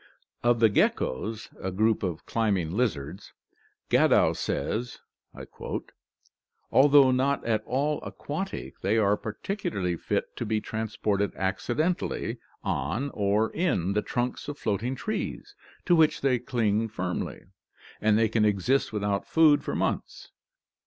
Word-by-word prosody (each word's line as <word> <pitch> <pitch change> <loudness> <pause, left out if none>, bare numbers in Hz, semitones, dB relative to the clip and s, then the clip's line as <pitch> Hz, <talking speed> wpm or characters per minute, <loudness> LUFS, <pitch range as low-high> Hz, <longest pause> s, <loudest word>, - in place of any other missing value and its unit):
Of 120 -1 +3
the 115 - +6
geckos, 105 - 0
a 95 - -2
group 110 +4 +1
of 90 -5 -3
climbing 100 -8 0
lizards, 95 - -2 0.6
Gadow - - +5
says: 120 +3 -2 0.4
"Al 140 +2 -3
though 140 -2 +7
not 135 +2 +1
at 110 -2 +1
all 145 +4 0
aquatic, 190 +7 -5
they 100 +4 +1
are 105 -2 +3
particularly 105 - -3
fit - - -2
to - - -2
be 110 -1 0
transported 105 -2 -2
accidentally 125 - -1 0.2
on 135 +9 -2
or 105 +2 +1
in 120 - 0
the 105 - +1
trunks 125 +2 -3
of 145 0 -5
floating 110 +4 -1
trees, 215 +10 -4 0.3
to 175 - +5
which 160 -2 +3
they 130 -3 +2
cling 115 -3 0
firmly, 90 -5 -4 0.6
and 110 -1 +4
they 115 0 +4
can 110 0 +1
exist 105 +6 +2
without 100 -2 -1
food 155 -3 +5
for - - -3
months." - - -3
110 Hz, 130 wpm, -27 LUFS, 100-130 Hz, 0.6 s, though